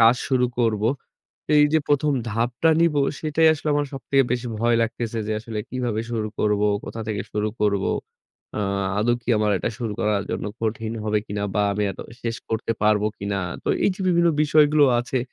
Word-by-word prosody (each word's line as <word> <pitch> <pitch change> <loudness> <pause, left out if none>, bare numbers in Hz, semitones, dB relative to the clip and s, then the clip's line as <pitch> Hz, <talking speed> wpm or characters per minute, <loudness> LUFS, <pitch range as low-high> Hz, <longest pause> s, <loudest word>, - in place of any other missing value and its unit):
কাজ 115 +2 +6
শুরু 130 -2 +2
করব। 110 -3 +1 0.7
এই 150 0 +7
যে 160 - +5
১ম 145 0 +2 0.2
ধাপটা 120 +8 +1
নিব 170 -2 +3 0.3
সেটাই 155 +1 +2
আসলে 155 0 -4
আমার 145 0 +1
সবথেকে 135 0 +1
বেশি 125 0 -1
ভয় 115 +1 +2
লাগতেছে 115 0 -3
যে 110 - -1
আসলে 110 -1 -6
কিভাবে 120 -4 -2
শুরু 110 -2 -2
করব, 105 -1 +1 0.2
কোথা 115 - -6
থেকে 105 -2 -2
শুরু 105 0 0
করব? 100 -2 +1 0.7
আ - - -1 0.4
আদৌ 120 +3 +2
কি 115 - -15
আমার 105 0 +2
এটা 115 - -2
শুরু 115 -4 -3
করার 105 -2 +1
জন্য - - -3 0.2
কঠিন 115 0 -2
হবে 105 0 +1
কিনা 100 0 -4
বা 105 - +2
আমি 105 +1 -1
আদৌ - - -9 0.2
শেষ 115 -1 -2
করতে 115 0 -1
পারব 105 -1 +3 0.2
কিনা। 100 0 -2 0.3
তো - - -2 0.2
এই - - +4
যে 190 - -12
বিভিন্ন 170 -1 +4
বিষয়গুলো 150 0 +5
আছে, 125 +2 -1
115 Hz, 190 wpm, -23 LUFS, 105-135 Hz, 0.7 s, এই